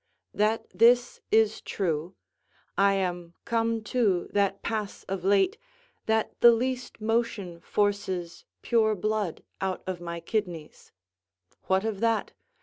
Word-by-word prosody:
That 220 Hz, +2 st, +1 dB
this 240 Hz, +2 st, +4 dB
is 220 Hz, -1 st, +3 dB
true: 170 Hz, -2 st, -2 dB, 0.6 s
I 200 Hz, 0 st, +4 dB
am 175 Hz, -3 st, -3 dB
come 230 Hz, -1 st, 0 dB
to 205 Hz, -8 st, +1 dB
that 200 Hz, -1 st, +1 dB
pass 215 Hz, -3 st, -3 dB
of 190 Hz, -2 st, -4 dB
late, 200 Hz, -, +3 dB, 0.5 s
that 220 Hz, 0 st, +1 dB
the 240 Hz, -, +9 dB
least 250 Hz, +2 st, -2 dB
motion 220 Hz, -5 st, -1 dB
forces 190 Hz, -4 st, -1 dB, 0.2 s
pure 220 Hz, -2 st, +3 dB
blood 210 Hz, -3 st, -2 dB, 0.2 s
out 190 Hz, -1 st, -2 dB
of 185 Hz, -2 st, -4 dB
my 170 Hz, 0 st, -5 dB
kidneys: 170 Hz, -4 st, -4 dB, 0.7 s
what 190 Hz, +2 st, +2 dB
of 215 Hz, -3 st, -2 dB
that? 230 Hz, 0 st, +1 dB
205 Hz, 125 wpm, -27 LUFS, 185-225 Hz, 0.7 s, the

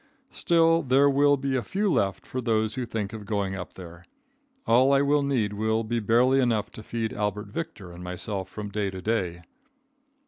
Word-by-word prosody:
Still 165 Hz, -1 st, +3 dB
there 135 Hz, 0 st, +4 dB
will 145 Hz, +1 st, +4 dB
be 135 Hz, 0 st, -2 dB
a 130 Hz, -, +1 dB
few 205 Hz, -, -1 dB
left 100 Hz, -, 0 dB
for 130 Hz, -, -4 dB
those 110 Hz, -2 st, 0 dB
who 125 Hz, -1 st, -4 dB
think 110 Hz, -2 st, -4 dB
of 110 Hz, -2 st, -7 dB
going 100 Hz, -3 st, -1 dB
up 90 Hz, -2 st, -7 dB
there. 85 Hz, -1 st, -11 dB, 0.6 s
All 130 Hz, +4 st, +4 dB
I 140 Hz, 0 st, +4 dB
will 145 Hz, +1 st, +3 dB
need 125 Hz, -7 st, 0 dB
will 110 Hz, +2 st, 0 dB
be 120 Hz, +2 st, -1 dB
barely 120 Hz, +5 st, +3 dB
enough 115 Hz, -5 st, +1 dB
to -, -, -10 dB
feed 115 Hz, 0 st, -3 dB
Albert 105 Hz, 0 st, -3 dB
Victor 115 Hz, -, -6 dB
and 85 Hz, +1 st, -10 dB
myself 95 Hz, +2 st, -5 dB
from 105 Hz, +1 st, -6 dB
day 100 Hz, -1 st, -2 dB
to 95 Hz, -1 st, -7 dB
day. 95 Hz, -6 st, -1 dB
110 Hz, 195 wpm, -26 LUFS, 100-135 Hz, 0.6 s, there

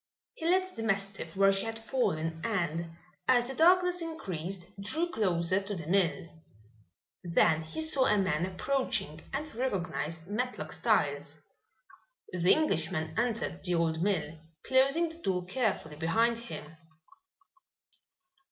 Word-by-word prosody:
He 325 Hz, 0 st, -2 dB
left 370 Hz, +1 st, +2 dB
the -, -, -3 dB
mastiff 195 Hz, -5 st, -2 dB
where 195 Hz, 0 st, +5 dB
she 195 Hz, +2 st, -1 dB
had 225 Hz, 0 st, -4 dB
fallen 165 Hz, -9 st, -1 dB
and, 170 Hz, -6 st, -1 dB, 0.3 s
as 245 Hz, -2 st, +4 dB
the 265 Hz, -, -4 dB
darkness 360 Hz, +3 st, +4 dB
increased, 190 Hz, -, -5 dB, 0.2 s
drew 315 Hz, +13 st, 0 dB
closer 185 Hz, -, +1 dB
to 200 Hz, +1 st, -4 dB
the 165 Hz, -4 st, -6 dB
mill. 175 Hz, -1 st, +1 dB, 1.0 s
Then 170 Hz, -2 st, +3 dB
he 160 Hz, -, -5 dB
saw 300 Hz, -4 st, +3 dB
a 210 Hz, -, +4 dB
man 180 Hz, -3 st, +1 dB
approaching 185 Hz, -, -1 dB
and 300 Hz, +3 st, -4 dB
recognized 175 Hz, -, -2 dB
Matlock 245 Hz, +5 st, -3 dB
Styles. -, -, 0 dB, 0.9 s
The 180 Hz, 0 st, +3 dB
Englishman 160 Hz, -, +1 dB
entered 230 Hz, -6 st, -1 dB
the 180 Hz, -1 st, 0 dB
old 165 Hz, -1 st, +1 dB
mill, 165 Hz, -5 st, -1 dB, 0.2 s
closing 275 Hz, +6 st, +3 dB
the 325 Hz, +1 st, -12 dB
door 180 Hz, -, -1 dB
carefully 190 Hz, -, -1 dB
behind 225 Hz, +9 st, +2 dB
him. 165 Hz, -9 st, -9 dB
195 Hz, 130 wpm, -30 LUFS, 165-255 Hz, 1.0 s, where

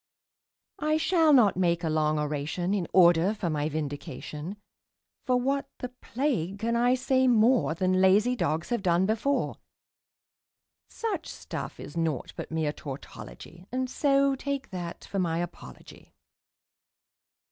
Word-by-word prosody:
I 305 Hz, +1 st, +1 dB
shall 325 Hz, -1 st, +3 dB
not 240 Hz, -9 st, +5 dB
make 170 Hz, -2 st, +1 dB
a 160 Hz, -, 0 dB
long 155 Hz, 0 st, +1 dB
oration 150 Hz, +5 st, -2 dB
in 185 Hz, -5 st, -1 dB
order 175 Hz, +2 st, +5 dB
for 175 Hz, -5 st, -2 dB
my 150 Hz, 0 st, -1 dB
vindication, 150 Hz, +3 st, -5 dB, 0.7 s
For 250 Hz, -1 st, +3 dB
what 275 Hz, +2 st, -1 dB
the 250 Hz, -, -5 dB
plague 245 Hz, -, -2 dB
can 230 Hz, +3 st, -1 dB
I 245 Hz, +2 st, +3 dB
say 260 Hz, 0 st, +2 dB
more 235 Hz, -6 st, +4 dB
Than 185 Hz, +1 st, +1 dB
lazy 205 Hz, +6 st, +4 dB
dogs 160 Hz, -6 st, -1 dB
have 240 Hz, -3 st, 0 dB
done 180 Hz, 0 st, +2 dB
before; 225 Hz, +7 st, 0 dB, 1.3 s
Such 410 Hz, -8 st, -3 dB
stuff -, -, -7 dB
is -, -, -9 dB
naught 160 Hz, -6 st, -2 dB
but -, -, -6 dB
mere 160 Hz, -2 st, -1 dB
tautology, 145 Hz, -, -10 dB
And 255 Hz, +1 st, -1 dB
so 275 Hz, -1 st, +3 dB
take 280 Hz, 0 st, -4 dB
that 175 Hz, -2 st, -6 dB
for 195 Hz, -, -3 dB
my 165 Hz, -3 st, 0 dB
apology. 170 Hz, -, -8 dB
190 Hz, 135 wpm, -28 LUFS, 165-255 Hz, 1.3 s, not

